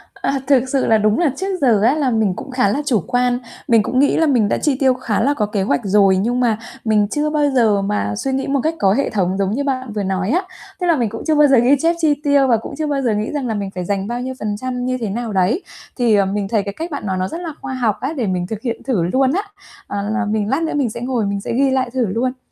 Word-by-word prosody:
À, 275 Hz, -, -1 dB
thực 265 Hz, -2 st, +3 dB
sự 270 Hz, 0 st, +1 dB
là 220 Hz, -, +4 dB
đúng 215 Hz, 0 st, +2 dB
là 335 Hz, -5 st, +2 dB
trước 385 Hz, 0 st, -2 dB
giờ 230 Hz, -7 st, +4 dB
á 245 Hz, +6 st, +4 dB
là 290 Hz, -4 st, +1 dB
mình 220 Hz, -5 st, +1 dB
cũng 270 Hz, -, -8 dB
khá 250 Hz, -5 st, +2 dB
là 275 Hz, +9 st, 0 dB
chủ 250 Hz, -7 st, +2 dB
quan, 245 Hz, 0 st, +1 dB, 0.3 s
mình 230 Hz, -3 st, +4 dB
cũng 255 Hz, -, 0 dB
nghĩ 285 Hz, -, +3 dB
là 325 Hz, -, +3 dB
mình 240 Hz, -8 st, +2 dB
đã -, -, +1 dB
chi 295 Hz, -3 st, +1 dB
tiêu 265 Hz, -2 st, +4 dB
khá 250 Hz, -4 st, -2 dB
là 280 Hz, +5 st, +2 dB
có 220 Hz, -7 st, 0 dB
kế 205 Hz, -1 st, -2 dB
hoạch 140 Hz, -7 st, 0 dB
rồi, 195 Hz, -1 st, +4 dB
nhưng 235 Hz, +6 st, 0 dB
mà 235 Hz, -4 st, +2 dB, 0.3 s
mình 210 Hz, -2 st, +3 dB
chưa 295 Hz, +8 st, -1 dB
bao 300 Hz, -1 st, +1 dB
giờ 215 Hz, -5 st, +3 dB
mà 150 Hz, -, -1 dB
suy 270 Hz, -, -2 dB
nghĩ 265 Hz, 0 st, -1 dB
một 275 Hz, 0 st, +1 dB
cách 320 Hz, +1 st, 0 dB
có 195 Hz, -1 st, +3 dB
hệ 275 Hz, +6 st, 0 dB
thống 190 Hz, -2 st, 0 dB
giống 195 Hz, -1 st, 0 dB
như 270 Hz, +6 st, -1 dB
bạn 255 Hz, -4 st, -3 dB
vừa 210 Hz, -1 st, -2 dB
nói 190 Hz, 0 st, -1 dB
á. 345 Hz, +8 st, +2 dB, 0.4 s
Tức 360 Hz, -, -1 dB
là 335 Hz, -, +4 dB
mình 240 Hz, -6 st, 0 dB
cũng 225 Hz, +2 st, -7 dB
chưa 315 Hz, -, +3 dB
bao 295 Hz, 0 st, +6 dB
giờ 270 Hz, -2 st, +5 dB
ghi 245 Hz, +4 st, +5 dB
chép 330 Hz, +3 st, +2 dB
chi 315 Hz, -3 st, +3 dB
tiêu 285 Hz, -2 st, +3 dB
và 235 Hz, -3 st, +4 dB
cũng 225 Hz, +6 st, -8 dB
chưa 310 Hz, -1 st, -2 dB
bao 285 Hz, -2 st, -1 dB
giờ 240 Hz, -4 st, +1 dB
nghĩ 210 Hz, +1 st, -2 dB
rằng 285 Hz, -4 st, -2 dB
là 225 Hz, -, -1 dB
mình 200 Hz, -2 st, -4 dB
phải 180 Hz, -2 st, -5 dB
dành 195 Hz, +1 st, -2 dB
bao 240 Hz, +2 st, -3 dB
nhiêu 260 Hz, +1 st, -4 dB
phần 210 Hz, -1 st, -3 dB
trăm 250 Hz, +1 st, -4 dB
như 255 Hz, 0 st, -1 dB
thế 225 Hz, -4 st, -3 dB
nào 225 Hz, +1 st, -4 dB
đấy. 195 Hz, -, +1 dB, 0.3 s
Thì, 235 Hz, -4 st, +3 dB
à, 200 Hz, -, +3 dB
mình 195 Hz, +1 st, -2 dB
thấy 210 Hz, -2 st, 0 dB
cái 200 Hz, -, -5 dB
cách 330 Hz, -, -6 dB
bạn 285 Hz, -, -5 dB
nói 190 Hz, -2 st, -1 dB
nó 185 Hz, 0 st, -1 dB
rất 335 Hz, -, -6 dB
là 330 Hz, -3 st, -5 dB
khoa 260 Hz, -, -5 dB
học 235 Hz, -5 st, 0 dB
á, 280 Hz, +5 st, -2 dB
để 235 Hz, -6 st, -1 dB
mình 180 Hz, -1 st, -1 dB
thực 215 Hz, 0 st, -5 dB
hiện 235 Hz, -3 st, -4 dB
thử 230 Hz, -9 st, 0 dB
luôn 260 Hz, +9 st, +2 dB
á. 385 Hz, -, +1 dB, 0.5 s
Ờ, 205 Hz, 0 st, -3 dB
là 230 Hz, +1 st, -1 dB
mình 210 Hz, -1 st, -1 dB
lát 275 Hz, +6 st, 0 dB
nữa 320 Hz, -, -2 dB
mình 275 Hz, -5 st, +1 dB
sẽ 235 Hz, +2 st, -7 dB
ngồi 245 Hz, -3 st, -1 dB
mình 200 Hz, 0 st, -2 dB
sẽ -, -, -4 dB
ghi 270 Hz, +3 st, +2 dB
lại 260 Hz, -1 st, 0 dB
thử 255 Hz, -2 st, +1 dB
luôn. 250 Hz, +6 st, -1 dB
240 Hz, 305 wpm, -19 LUFS, 205-275 Hz, 0.5 s, bao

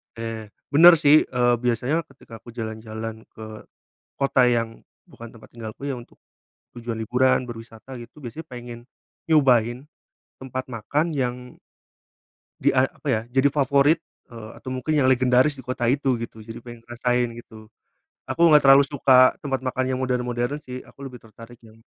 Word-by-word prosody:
Eee, 115 Hz, -1 st, -6 dB, 0.2 s
bener 170 Hz, +5 st, +8 dB
sih, 150 Hz, 0 st, +5 dB
eee, 120 Hz, -1 st, +2 dB
biasanya 125 Hz, +7 st, -1 dB
ketika 115 Hz, -7 st, -14 dB
aku 120 Hz, +1 st, -14 dB
jalan-jalan 110 Hz, -1 st, -7 dB
ke 110 Hz, -1 st, -11 dB, 0.5 s
kota 135 Hz, -2 st, +3 dB
yang 115 Hz, -2 st, -1 dB, 0.3 s
bukan 115 Hz, -1 st, -12 dB
tempat 115 Hz, -, -16 dB
tinggalku, 110 Hz, -1 st, -10 dB
ya, 130 Hz, -, -3 dB
untuk 120 Hz, -, -14 dB, 0.6 s
tujuan 115 Hz, -1 st, -6 dB
liburan, 125 Hz, +3 st, +1 dB
berwisata 115 Hz, +2 st, -10 dB
gitu, 120 Hz, +5 st, -13 dB
biasanya 150 Hz, +4 st, -9 dB
pengen 120 Hz, -1 st, -8 dB, 0.5 s
nyobain 125 Hz, -4 st, +3 dB, 0.5 s
tempat 130 Hz, 0 st, -5 dB
makan 145 Hz, +8 st, -1 dB
yang 125 Hz, -3 st, -4 dB, 1.0 s
Di -, -, +3 dB
a 130 Hz, 0 st, +2 dB
apa -, -, -12 dB
ya, 110 Hz, -, 0 dB
jadi 135 Hz, +2 st, +2 dB
favorit, 140 Hz, +3 st, +3 dB, 0.3 s
eee, 110 Hz, -2 st, -9 dB
atau -, -, -9 dB
mungkin 140 Hz, +5 st, -1 dB
yang 140 Hz, -, +3 dB
legendaris 130 Hz, +2 st, +3 dB
di 135 Hz, -, -11 dB
kota 125 Hz, -1 st, -3 dB
itu 130 Hz, +1 st, +1 dB
gitu, 115 Hz, -1 st, -8 dB
jadi 115 Hz, +1 st, -10 dB
pengen 120 Hz, -1 st, -11 dB
ngerasain 120 Hz, 0 st, 0 dB
gitu. 110 Hz, -2 st, -13 dB, 0.6 s
Aku 170 Hz, -1 st, +3 dB
gak 150 Hz, -1 st, +6 dB
terlalu 135 Hz, +1 st, +8 dB
suka 130 Hz, -2 st, +4 dB
tempat 135 Hz, -2 st, -3 dB
makan 130 Hz, 0 st, -1 dB
yang -, -, -4 dB
modern-modern 125 Hz, +1 st, -2 dB
sih, 125 Hz, -3 st, -9 dB
aku 140 Hz, 0 st, -11 dB
lebih 125 Hz, -2 st, -13 dB
tertarik 115 Hz, +2 st, -14 dB
yang 110 Hz, 0 st, -18 dB
125 Hz, 160 wpm, -23 LUFS, 115-135 Hz, 1.0 s, bener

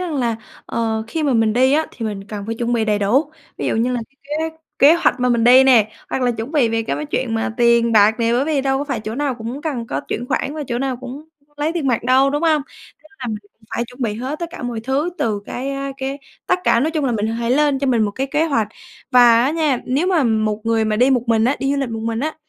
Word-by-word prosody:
rằng 350 Hz, -4 st, -3 dB
là, 235 Hz, -5 st, 0 dB, 0.3 s
ờ, 225 Hz, -1 st, -1 dB
khi 310 Hz, +7 st, -3 dB
mà 280 Hz, -3 st, +1 dB
mình 225 Hz, -1 st, +3 dB
đi 260 Hz, +4 st, +3 dB
á 315 Hz, +1 st, +2 dB
thì 230 Hz, -, -5 dB
mình 200 Hz, -2 st, -5 dB
cần 205 Hz, 0 st, -7 dB
phải 225 Hz, -, -3 dB
chuẩn 235 Hz, +1 st, -2 dB
bị 225 Hz, -2 st, +1 dB
đầy 210 Hz, -1 st, +1 dB
đủ. 230 Hz, +10 st, +1 dB, 0.3 s
Ví -, -, -2 dB
dụ -, -, 0 dB
như 240 Hz, +3 st, +1 dB
là 245 Hz, -, -1 dB
cái 270 Hz, -, -37 dB, 0.3 s
kế 320 Hz, -, -23 dB, 0.2 s
kế 290 Hz, +4 st, +7 dB
hoạch 340 Hz, -6 st, +1 dB
mà 250 Hz, -, +2 dB
mình 235 Hz, -2 st, +2 dB
đi 255 Hz, +2 st, +7 dB
nè, 230 Hz, -5 st, +5 dB, 0.2 s
hoặc 260 Hz, -, -1 dB
là 245 Hz, -, +2 dB
chuẩn 230 Hz, +4 st, -5 dB
bị 280 Hz, -7 st, +3 dB
về 225 Hz, 0 st, 0 dB
cái 150 Hz, -6 st, -3 dB
chuyện 230 Hz, -3 st, -1 dB
mà 225 Hz, 0 st, -2 dB
tiền 235 Hz, -1 st, +3 dB
bạc 215 Hz, 0 st, +5 dB
nè, 230 Hz, 0 st, +2 dB
bởi 255 Hz, +3 st, +2 dB
vì 300 Hz, -3 st, 0 dB
đâu 270 Hz, 0 st, 0 dB
có 285 Hz, -, -2 dB
phải 265 Hz, -6 st, -3 dB
chỗ 215 Hz, +1 st, -5 dB
nào 280 Hz, -1 st, -1 dB
cũng 235 Hz, +5 st, -6 dB
cần 260 Hz, -8 st, -3 dB
có -, -, -3 dB
chuyển 240 Hz, -, -3 dB
khoản 275 Hz, +3 st, -2 dB
và 310 Hz, -, -4 dB
chỗ 240 Hz, 0 st, -2 dB
nào 265 Hz, -1 st, -2 dB
cũng 260 Hz, +4 st, -9 dB, 0.3 s
lấy 300 Hz, +3 st, -1 dB
tiền 325 Hz, -5 st, -2 dB
mặt 240 Hz, -4 st, +1 dB
đâu, 260 Hz, +2 st, +4 dB
đúng 290 Hz, +2 st, -2 dB
hông? 310 Hz, -3 st, +3 dB, 0.4 s
Nên 310 Hz, -, -21 dB
là 255 Hz, -, -5 dB
mình 215 Hz, -2 st, -3 dB, 0.3 s
phải 235 Hz, -, -2 dB
chuẩn 250 Hz, +2 st, -9 dB
bị 215 Hz, -3 st, -1 dB
hết 260 Hz, +7 st, -4 dB
tất 340 Hz, -, -3 dB
cả 350 Hz, -, -9 dB
mọi 240 Hz, -2 st, -3 dB
thứ 270 Hz, +8 st, -1 dB
từ 215 Hz, -3 st, -1 dB
cái, 265 Hz, +3 st, -4 dB
a, 275 Hz, 0 st, -4 dB
cái 270 Hz, +1 st, -4 dB, 0.3 s
tất 360 Hz, -, +2 dB
cả, 230 Hz, -, +4 dB
nói 305 Hz, +5 st, +1 dB
chung 310 Hz, -3 st, -1 dB
là 250 Hz, -, +1 dB
mình 215 Hz, -1 st, -1 dB
hãy 230 Hz, +1 st, -2 dB
lên 285 Hz, +1 st, +2 dB
cho 275 Hz, -, -1 dB
mình 240 Hz, -4 st, +2 dB
một 205 Hz, -, 0 dB
cái 265 Hz, +6 st, -3 dB
kế 300 Hz, +4 st, +1 dB
hoạch. 230 Hz, -9 st, 0 dB, 0.4 s
Và 240 Hz, -1 st, +6 dB
á 275 Hz, -, +2 dB
nha, 305 Hz, -5 st, 0 dB
nếu 275 Hz, +8 st, 0 dB
mà 345 Hz, -7 st, +2 dB
một 215 Hz, -2 st, 0 dB
người 225 Hz, -1 st, +2 dB
mà 215 Hz, -1 st, 0 dB
đi 250 Hz, +4 st, +4 dB
một 250 Hz, -3 st, +2 dB
mình 225 Hz, -1 st, +2 dB
á, 265 Hz, +4 st, +2 dB
đi 270 Hz, -, -1 dB
du -, -, 0 dB
lịch 270 Hz, -, -2 dB
một 225 Hz, -1 st, -4 dB
mình 230 Hz, +1 st, -2 dB
á, 310 Hz, +2 st, -2 dB
250 Hz, 290 wpm, -19 LUFS, 225-275 Hz, 0.4 s, kế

